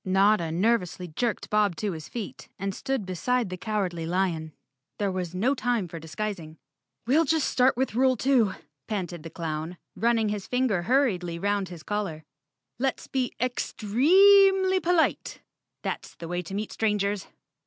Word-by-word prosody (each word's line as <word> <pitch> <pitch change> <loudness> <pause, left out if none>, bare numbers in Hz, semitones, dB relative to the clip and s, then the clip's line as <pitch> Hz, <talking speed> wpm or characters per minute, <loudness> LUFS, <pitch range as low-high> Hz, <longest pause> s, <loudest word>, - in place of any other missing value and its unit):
Notta 190 -2 +3
nervously 180 -1 0
jerked 230 +8 -2
Bob 210 -4 +3
to 205 +4 -2
his 160 -3 -7
feet 225 -5 -7
and 195 0 -3
stood 265 -1 -2
beside 205 +4 -1
the - - -2
Cowardly 185 -5 -2
Lion. 170 -3 -1 0.5
There 200 -2 0
was 180 -2 -4
no 235 +9 +2
time 245 -7 0
for 165 0 -8
dis¬ 160 0 -11
guising. 180 -7 -4 0.5
"We'll 285 +7 +4
just 315 -1 +1
start 255 -1 +3
with 265 -3 0
rule 255 +1 +3
two," 250 -7 +3 0.3
panted 180 -5 -3
the 165 - -8
clown, 160 +1 -4 0.2
running 230 -2 +2
his 205 -2 -4
finger 250 -7 +1
hurriedly 185 -7 +1
'round 200 0 -1
his 170 -3 -10
collar. 195 -7 -3 0.6
"Let's 265 +1 -1
be 255 -2 -2
ex—tre—eemly 375 - +4
polite. 340 -1 +1 0.4
That's - - -4
the 165 - -8
way 175 +1 -2
to 180 +3 -7
meet 210 +1 -3
strangers." 205 -2 0
205 Hz, 155 wpm, -27 LUFS, 180-250 Hz, 0.6 s, We'll